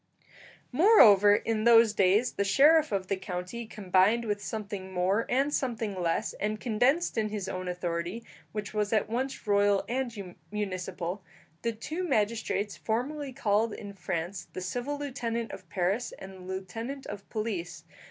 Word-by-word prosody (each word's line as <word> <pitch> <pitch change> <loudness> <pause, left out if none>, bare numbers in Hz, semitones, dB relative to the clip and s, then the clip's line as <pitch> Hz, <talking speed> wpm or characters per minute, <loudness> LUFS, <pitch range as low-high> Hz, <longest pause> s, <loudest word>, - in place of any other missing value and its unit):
Moreover, 220 - +7
in 220 0 -1
those 230 -2 +6
days 205 +4 +3
the 200 - -1
sheriff 300 +9 +5
of 195 -2 -1
the 195 - -1
county 185 +5 -5
combined 205 +3 +2
with 205 -2 -2
something 205 -3 -5
more 190 +5 +1
and 275 +4 +1
something 230 -7 -1
less, 175 -3 -1
and 215 +1 -1
condensed 250 +6 +1
in 215 -1 0
his 205 -3 -4
own 185 -1 -4
authority, 175 +4 -3 0.3
which 210 -1 -5
was 210 -1 0
at 215 -3 +2
once 260 +4 -3
royal 205 -1 +3
and 235 -7 -3 0.2
municipal, 185 -2 -4 0.4
the 230 - 0
two 310 +11 -5
magistrates 215 - 0
formerly 270 +5 -2
called 225 -3 +1
in 200 -1 -8
France 180 0 -4
the - - -4
civil 245 +10 -3
lieutenant 235 -5 -3
of - - -10
Paris 195 +6 -1
and 190 0 -9
the 190 - -12
lieutenant 225 +9 -5
of 200 -1 -8
police. 180 -7 -4
210 Hz, 150 wpm, -29 LUFS, 190-235 Hz, 0.4 s, Moreover